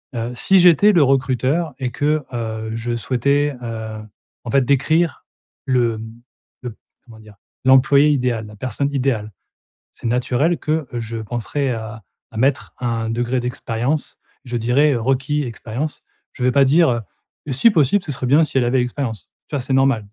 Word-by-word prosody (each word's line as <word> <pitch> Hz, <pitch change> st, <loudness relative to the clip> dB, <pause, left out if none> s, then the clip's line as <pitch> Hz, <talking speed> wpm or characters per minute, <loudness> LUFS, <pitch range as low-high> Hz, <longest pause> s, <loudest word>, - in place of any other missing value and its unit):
heu, 120 Hz, +1 st, -3 dB
si 190 Hz, +10 st, +4 dB
j'étais 180 Hz, +3 st, +6 dB
le 175 Hz, -5 st, +4 dB
recruteur 135 Hz, +4 st, +1 dB
et 125 Hz, -2 st, -2 dB
que, 150 Hz, +1 st, 0 dB
heu, 110 Hz, -2 st, -4 dB
je 120 Hz, +1 st, -3 dB
souhaitais, 140 Hz, +4 st, 0 dB
heu, 110 Hz, -2 st, -5 dB, 0.4 s
en 120 Hz, -, -5 dB
fait 135 Hz, -1 st, +3 dB
décrire 145 Hz, +4 st, +1 dB, 0.4 s
le, 120 Hz, -3 st, +1 dB
mmh, 110 Hz, +1 st, -11 dB, 0.4 s
le 125 Hz, -, -4 dB
p -, -, -31 dB, 0.3 s
comment 115 Hz, -3 st, -15 dB
dire? 105 Hz, -1 st, -16 dB, 0.3 s
L'employé 135 Hz, +3 st, +5 dB
idéal, 125 Hz, -6 st, 0 dB
la 105 Hz, 0 st, -13 dB
personne 130 Hz, +5 st, -2 dB
idéale.», 125 Hz, -6 st, -1 dB, 0.6 s
c'est -, -, -8 dB
naturel 125 Hz, +7 st, +1 dB
que 155 Hz, -1 st, -1 dB
je 115 Hz, -1 st, -4 dB
penserais 120 Hz, +5 st, -3 dB
à 110 Hz, -1 st, -7 dB, 0.3 s
à -, -, -11 dB
mettre 130 Hz, +3 st, 0 dB
un 115 Hz, -2 st, -2 dB
degré 120 Hz, +2 st, -1 dB
d'expérience, 125 Hz, +3 st, -3 dB, 0.3 s
je 120 Hz, -1 st, -4 dB
dirais, 125 Hz, +6 st, +2 dB
heu: 120 Hz, -, -1 dB
«Requis: 135 Hz, +4 st, 0 dB
expérience.». 120 Hz, +5 st, -5 dB, 0.3 s
Je 125 Hz, -, -7 dB
vais 125 Hz, -, +3 dB
pas 140 Hz, +1 st, +5 dB
dire, 160 Hz, +5 st, +4 dB
heu: 120 Hz, -1 st, -1 dB, 0.5 s
«Et 140 Hz, -, -3 dB
si 140 Hz, -, +5 dB
possible, 175 Hz, -, +2 dB
ce 150 Hz, -, -4 dB
serait 130 Hz, -1 st, -4 dB
bien 145 Hz, +6 st, +5 dB
si 140 Hz, -, -1 dB
elle 125 Hz, -, +2 dB
avait 125 Hz, +2 st, +2 dB
l'expérience», 125 Hz, -4 st, -4 dB, 0.2 s
tu 145 Hz, -, -3 dB
vois? -, -, -1 dB
C'est 130 Hz, -, -4 dB
normal 135 Hz, -5 st, +2 dB
125 Hz, 180 wpm, -20 LUFS, 115-145 Hz, 0.6 s, j'étais